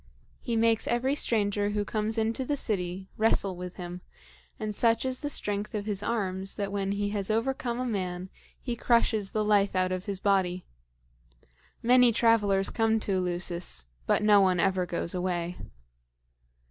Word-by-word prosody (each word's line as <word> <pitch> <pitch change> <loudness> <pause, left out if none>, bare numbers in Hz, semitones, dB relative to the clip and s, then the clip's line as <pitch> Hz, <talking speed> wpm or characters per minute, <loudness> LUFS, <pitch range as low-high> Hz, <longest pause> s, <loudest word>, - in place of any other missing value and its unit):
He 235 - -3
makes 225 0 +2
every 250 +3 +1
stranger 205 -6 +1
who 205 0 -1
comes 215 +1 -2
into 225 +3 0
the 285 +3 -1
city 190 -5 -2
wrestle 205 -3 +2
with 180 0 -7
him; 180 -1 -7 0.6
and 215 -1 -3
such 230 +3 +2
is 255 -1 -2
the 290 - -3
strength 205 -5 -3
of 205 -1 -3
his 205 -2 -2
arms 195 -4 -2
that 200 -1 -3
when 200 -1 -1
he 205 0 -1
has 205 -1 -3
overcome 240 +2 -1
a 255 - -1
man 185 -5 -3 0.3
he 240 -2 -3
crushes 225 -4 +2
the 215 +1 -1
life 205 -2 +3
out 185 0 +1
of 185 0 -3
his 200 -2 -3
body. 185 -3 +1 1.2
Many 245 0 +6
travelers 210 -4 +2
come 225 -1 +2
to 205 - -2
Eleusis, 175 - -2 0.2
but - - +2
no 210 -1 +6
one 185 -2 +3
ever 185 -1 +1
goes 170 -1 -3
away." 180 -1 -2
205 Hz, 165 wpm, -28 LUFS, 185-225 Hz, 1.2 s, Many